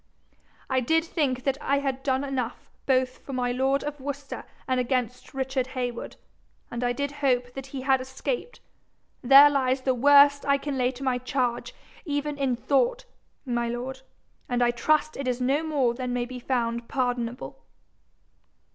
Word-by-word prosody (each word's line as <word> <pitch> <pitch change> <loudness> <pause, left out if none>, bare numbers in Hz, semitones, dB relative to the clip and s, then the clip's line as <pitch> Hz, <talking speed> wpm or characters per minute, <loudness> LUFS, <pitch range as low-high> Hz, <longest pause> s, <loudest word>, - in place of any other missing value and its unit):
'I 260 - +3
did 320 +6 +2
think 275 -7 -1
that 275 0 0
I 280 -1 +1
had 270 -2 -2
done 265 -1 0
enough 255 -4 -4 0.2
both 255 -1 +1
for 275 - -9
my 250 -1 0
lord 265 +2 +1
of 295 0 -5
Worcester 280 +1 -6 0.2
and 255 -1 +1
against 250 0 -2
Richard 265 -1 -1
Heywood, 245 -1 -3 0.6
and 240 +1 -3
I 245 - +2
did 285 +3 -2
hope 250 -3 +1
that 270 0 -7
he 270 -1 -6
had 265 0 +2
escaped: 470 - -4 0.6
there 275 +3 +9
lies 265 -2 +1
the 260 0 +1
worst 285 +2 +6
I 280 0 +3
can 280 0 -4
lay 250 -1 +2
to 260 +1 -8
my 255 -2 +1
charge 250 -1 -2 0.3
even 295 -2 -2
in 265 -3 +1
thought, 475 - +1 0.4
my 240 -2 -1
lord, 255 +2 -5 0.5
and 245 0 +2
I 240 - +3
trust 305 +6 +1
it 275 -1 -4
is 250 0 0
no 270 +4 +1
more 285 -7 +1
than 250 0 -4
may 245 -1 -1
be 250 0 -8
found 235 -2 -1
pardonable.' 245 -2 -3
260 Hz, 170 wpm, -26 LUFS, 245-280 Hz, 0.6 s, there